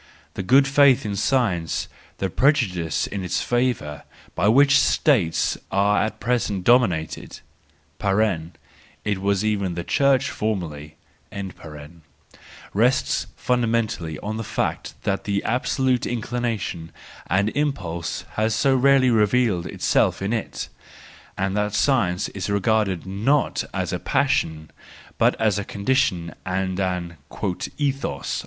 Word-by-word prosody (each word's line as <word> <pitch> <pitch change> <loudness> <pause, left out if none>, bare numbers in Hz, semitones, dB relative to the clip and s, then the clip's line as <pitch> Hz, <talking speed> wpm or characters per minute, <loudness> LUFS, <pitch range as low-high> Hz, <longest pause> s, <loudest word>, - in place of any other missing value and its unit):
The - - -4
good 135 +8 +4
faith 135 -2 +5
in 105 -1 -2
science, 100 -9 0 0.3
the 95 -2 -2
prejudice 95 - +1
in 100 - -5
its 90 - -1
favour, 120 - -1 0.3
by 95 - +1
which 135 +4 +6
States 110 - +2
are 100 +1 +3
at 110 - -4
present 105 -5 -1
dominated 95 -9 +1 0.6
(it 95 0 -2
was 100 +1 +1
even 100 -5 0
the 85 - -3
Church 135 +3 +2
formerly), 80 -8 -4 1.8
rests 120 +6 +1
fundamentally 115 - -1
on 110 +1 -4
the 115 - -3
fact - - -3
that 95 - -1
the 100 -1 -1
absolute 130 +1 0
inclination 115 -8 -3 0.4
and 100 +4 +2
impulse 95 - -3
has 110 0 +1
so 135 +3 +3
rarely 130 -1 +4
revealed 110 -4 +2
itself - - +1
in 100 +4 -2
it, 110 - -3 0.7
and 95 +1 -1
that 105 0 0
science 105 -6 +2
is 95 0 -5
regarded 100 -3 +1
not 110 +10 +1
as - - -2
a - - -2
passion, 80 -1 0 0.5
but - - +3
as 105 -2 +2
a - - -3
condition 100 - 0
and 95 0 -2
an 90 -3 -2 0.3
" - - +2 0.3
ethos." 135 - -2
105 Hz, 120 wpm, -23 LUFS, 95-125 Hz, 1.8 s, which